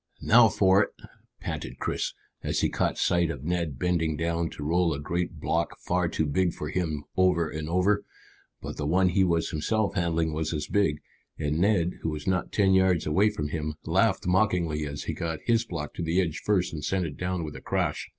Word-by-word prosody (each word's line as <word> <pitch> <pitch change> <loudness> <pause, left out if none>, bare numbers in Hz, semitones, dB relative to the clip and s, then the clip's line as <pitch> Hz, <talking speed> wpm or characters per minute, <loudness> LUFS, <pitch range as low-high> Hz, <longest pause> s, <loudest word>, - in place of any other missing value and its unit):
"Now 115 0 +7
for 95 0 +4
it!" - - -1 0.5
panted - - -5
Chris, - - -2 0.3
as - - -1
he - - +2
caught - - -1
sight 85 -2 +2
of 75 -5 -5
Ned 85 -4 -1
bending 80 -1 0
down 85 0 -1
to 75 - -8
roll 85 +1 +2
a - - -5
great 85 +2 -3
block 85 +3 -1
far 90 0 0
too 80 -1 -1
big 85 +4 +1
for 75 - -5
him 80 -4 -2
over 90 -3 +3
and 80 0 -5
over. 90 +4 +2 0.6
But - - -6
the 75 - -2
one 90 +3 +3
he 95 +2 +3
was 85 -2 +1
himself 100 +7 0
handling 85 -4 0
was 80 +1 -2
as 75 -1 -2
big, 80 -8 +1 0.4
and 75 0 -1
Ned, 90 -3 +2
who 80 - -1
was 75 -1 -5
not 90 -1 0
ten 95 -2 +3
yards 95 -3 +3
away 95 +8 +3
from 75 -8 -4
him, 75 -1 -3
laughed - - +2
mockingly 90 -5 +1
as 70 0 -5
he - - -3
got 80 -1 -3
his 115 0 +2
block 80 -7 -5
to - - -6
the 85 +2 +1
edge 85 -4 -1
first 95 -5 +1
and 75 -2 -5
sent 95 +4 0
it 75 -3 -5
down 90 -1 -2
with 75 -1 -6
a - - -8
crash. - - -1
85 Hz, 210 wpm, -27 LUFS, 80-95 Hz, 0.6 s, Now